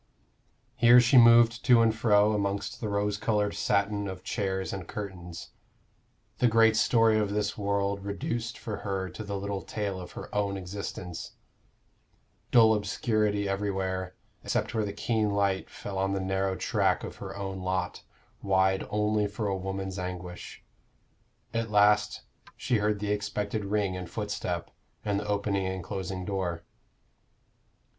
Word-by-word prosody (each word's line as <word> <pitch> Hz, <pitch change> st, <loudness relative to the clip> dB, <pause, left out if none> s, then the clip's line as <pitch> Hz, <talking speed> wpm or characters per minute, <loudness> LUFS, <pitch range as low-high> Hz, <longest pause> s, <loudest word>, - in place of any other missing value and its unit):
Here 120 Hz, 0 st, +8 dB
she 125 Hz, +1 st, +6 dB
moved 115 Hz, 0 st, +6 dB
to 120 Hz, -3 st, +6 dB
and 110 Hz, -1 st, +2 dB
fro 105 Hz, -2 st, +4 dB
amongst 100 Hz, -1 st, -2 dB
the 110 Hz, -, -2 dB
rose 105 Hz, 0 st, 0 dB
colored 105 Hz, -2 st, +1 dB
satin 100 Hz, 0 st, 0 dB
of 95 Hz, -1 st, -7 dB
chairs 95 Hz, -2 st, -2 dB
and 95 Hz, -4 st, -6 dB
curtains 90 Hz, -5 st, -7 dB, 0.9 s
the 125 Hz, -, +4 dB
great 115 Hz, -1 st, +5 dB
story 115 Hz, -1 st, +4 dB
of 105 Hz, -1 st, 0 dB
this 105 Hz, +1 st, -1 dB
world 100 Hz, -1 st, -1 dB
reduced 115 Hz, +2 st, -3 dB
for 105 Hz, -2 st, -5 dB
her 95 Hz, -2 st, -3 dB
to 110 Hz, -, -7 dB
the 100 Hz, -1 st, -4 dB
little 100 Hz, 0 st, -3 dB
tale 100 Hz, -3 st, -4 dB
of 90 Hz, -, -10 dB
her -, -, -9 dB
own 100 Hz, -1 st, 0 dB
existence 95 Hz, -2 st, -6 dB, 1.2 s
dull 115 Hz, -2 st, +6 dB
obscurity 105 Hz, 0 st, 0 dB
everywhere, 95 Hz, -2 st, -2 dB, 0.3 s
except -, -, -1 dB
where 110 Hz, -2 st, +1 dB
the 100 Hz, -, -3 dB
keen 110 Hz, +1 st, 0 dB
light 100 Hz, -2 st, 0 dB
fell 100 Hz, -1 st, -6 dB
on 95 Hz, 0 st, 0 dB
the 100 Hz, -, 0 dB
narrow 95 Hz, 0 st, -1 dB
track -, -, +1 dB
of -, -, -7 dB
her -, -, -7 dB
own 95 Hz, -1 st, -4 dB
lot, 90 Hz, 0 st, -2 dB, 0.4 s
wide 95 Hz, -1 st, +2 dB
only 105 Hz, 0 st, +1 dB
for 105 Hz, +2 st, -4 dB
a 100 Hz, -1 st, 0 dB
woman's 95 Hz, 0 st, -4 dB
anguish. 90 Hz, -1 st, -7 dB, 0.9 s
At 115 Hz, 0 st, -1 dB
last 105 Hz, 0 st, +3 dB, 0.3 s
she 125 Hz, -2 st, +1 dB
heard 105 Hz, -1 st, 0 dB
the 105 Hz, 0 st, -1 dB
expected 105 Hz, 0 st, -2 dB
ring 100 Hz, -2 st, 0 dB
and 90 Hz, -2 st, -6 dB
footstep, 105 Hz, -5 st, -3 dB, 0.3 s
and 100 Hz, -1 st, +1 dB
the 105 Hz, -, -6 dB
opening 100 Hz, -2 st, 0 dB
and 95 Hz, -1 st, -4 dB
closing 95 Hz, +1 st, -4 dB
door. 90 Hz, -4 st, -2 dB
100 Hz, 150 wpm, -28 LUFS, 95-105 Hz, 1.2 s, Here